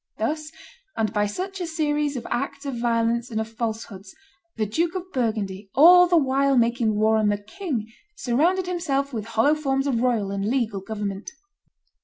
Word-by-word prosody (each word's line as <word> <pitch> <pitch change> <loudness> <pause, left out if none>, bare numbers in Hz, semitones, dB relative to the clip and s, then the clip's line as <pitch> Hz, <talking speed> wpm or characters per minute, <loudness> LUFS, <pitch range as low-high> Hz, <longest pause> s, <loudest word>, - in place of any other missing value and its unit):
Thus, 305 +7 -2 0.5
and 220 -2 0
by 210 -1 +1
such 375 - -5
a 350 - -2
series 300 -3 -1
of 240 - -5
acts 280 +3 -3
of 265 -4 -4
violence 235 +1 +1
and 220 -2 -2
of 220 - -2
falsehoods, 220 -4 -5 0.4
the 220 - 0
Duke 330 - -1
of 370 0 -5
Burgundy, 210 -5 -2
all 355 +5 +8
the 350 -1 +4
while 275 -1 +2
making 235 -2 +2
war 220 +1 +3
on 215 -1 +2
the 205 - +1
king, 235 - -4 0.3
surrounded 340 +8 +1
himself 285 -6 -1
with 220 -3 -4
hollow 230 +6 +2
forms 270 -3 -1
of 250 -5 0
royal 230 -6 +1
and 200 0 -2
legal 225 -3 -1
government. 205 -1 -5
240 Hz, 175 wpm, -24 LUFS, 220-295 Hz, 0.5 s, all